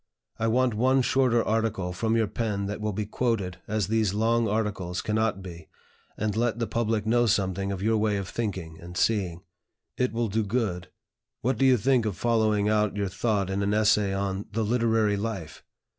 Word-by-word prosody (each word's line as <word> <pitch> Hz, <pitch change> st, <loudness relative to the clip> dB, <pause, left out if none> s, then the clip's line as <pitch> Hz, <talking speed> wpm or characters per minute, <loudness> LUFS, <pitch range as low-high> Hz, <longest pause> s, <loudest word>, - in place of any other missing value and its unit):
I 115 Hz, -, +1 dB
want 125 Hz, +1 st, +2 dB
one 130 Hz, +4 st, +3 dB
shorter 125 Hz, -3 st, +2 dB
article 110 Hz, -5 st, -1 dB
from 110 Hz, +5 st, 0 dB
your 115 Hz, -, +3 dB
pen 105 Hz, -2 st, -2 dB
that 105 Hz, +2 st, -4 dB
will 105 Hz, 0 st, -1 dB
be 105 Hz, +1 st, -3 dB
quoted, 100 Hz, -5 st, -1 dB
as 105 Hz, -1 st, 0 dB
these 110 Hz, -2 st, +1 dB
long 115 Hz, +1 st, +2 dB
articles 100 Hz, -5 st, -2 dB
cannot 110 Hz, -2 st, -1 dB
be, 85 Hz, -3 st, -10 dB, 0.5 s
and 105 Hz, -1 st, -1 dB
let 115 Hz, -1 st, 0 dB
the 115 Hz, -, -1 dB
public 110 Hz, -2 st, -1 dB
know 120 Hz, +2 st, +3 dB
something 100 Hz, -2 st, 0 dB
of 95 Hz, -1 st, -4 dB
your 110 Hz, +1 st, +2 dB
way 105 Hz, -1 st, +1 dB
of 100 Hz, -1 st, -4 dB
thinking 95 Hz, -9 st, -4 dB
and 90 Hz, +1 st, -9 dB
seeing. 95 Hz, -6 st, 0 dB, 0.5 s
It 125 Hz, -, +1 dB
will 115 Hz, 0 st, -1 dB
do 110 Hz, +2 st, 0 dB
good. 100 Hz, -5 st, -2 dB, 0.5 s
What 125 Hz, -1 st, 0 dB
do 135 Hz, -, +4 dB
you 130 Hz, -1 st, +5 dB
think 125 Hz, 0 st, +2 dB
of 100 Hz, -, -3 dB
following 110 Hz, -3 st, +2 dB
out 105 Hz, -1 st, +1 dB
your 100 Hz, -2 st, -1 dB
thought 100 Hz, -1 st, -1 dB
in 95 Hz, +1 st, -1 dB
an 100 Hz, +1 st, +1 dB
essay 105 Hz, -2 st, +3 dB
on 95 Hz, 0 st, -2 dB
'The 110 Hz, +1 st, -1 dB
Literary 110 Hz, -2 st, +2 dB
Life?' 100 Hz, -6 st, -5 dB
105 Hz, 190 wpm, -26 LUFS, 100-115 Hz, 0.5 s, you